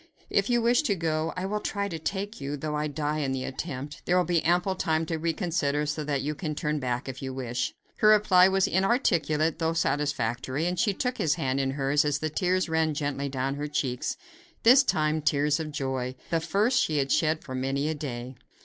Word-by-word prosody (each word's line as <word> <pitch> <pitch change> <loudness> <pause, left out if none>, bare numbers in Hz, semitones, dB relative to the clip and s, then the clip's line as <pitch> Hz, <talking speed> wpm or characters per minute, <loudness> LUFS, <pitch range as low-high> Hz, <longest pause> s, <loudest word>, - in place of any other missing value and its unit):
If 200 +2 +2
you 240 -1 +2
wish 240 +1 +4
to 200 - +3
go, 160 -1 -1
I 185 - -2
will 210 +2 -1
try 200 -1 -2
to 165 -4 -5
take 200 +3 -4
you, 140 +2 -3
though 150 +2 -4
I 150 0 -1
die 150 +1 -2
in 135 -3 -1
the 130 -1 -2
attempt. 135 +1 -5
There 180 - +3
will 180 - +4
be 175 -2 +1
ample 175 +4 +2
time 160 -3 0
to 160 0 -2
reconsider, 160 -3 0
so 150 +1 -2
that 140 -2 -1
you 150 +2 -1
can 150 -1 -4
turn 150 0 -1
back 125 0 -2
if 130 -1 -6
you 130 -1 -5
wish." 125 -2 -3 0.2
Her 215 - +3
reply 205 -4 +6
was 190 0 +2
inarticulate, 170 - +1
though 165 0 +1
satisfactory; 140 -3 -1
and 180 0 -1
she 210 -4 +2
took 250 +3 -2
his 150 -2 +2
hand 135 0 -1
in 135 -1 0
hers 140 +1 +1
as 150 -1 +1
the 155 +1 -3
tears 185 +3 +1
ran 160 -1 +1
gently 140 -1 -2
down 135 0 -2
her 145 +1 -3
cheeks; 130 -4 -2 0.5
this 255 +4 +8
time 155 - +1
tears 145 +1 +2
of 155 -1 -4
joy 130 -3 -3 0.2
the 165 - +2
first 210 +9 +2
she 155 - -1
had 135 -1 0
shed 155 0 +2
for 130 - -8
many 135 +3 -1
a 160 - 0
day. 130 -4 -5
155 Hz, 220 wpm, -27 LUFS, 140-180 Hz, 0.5 s, this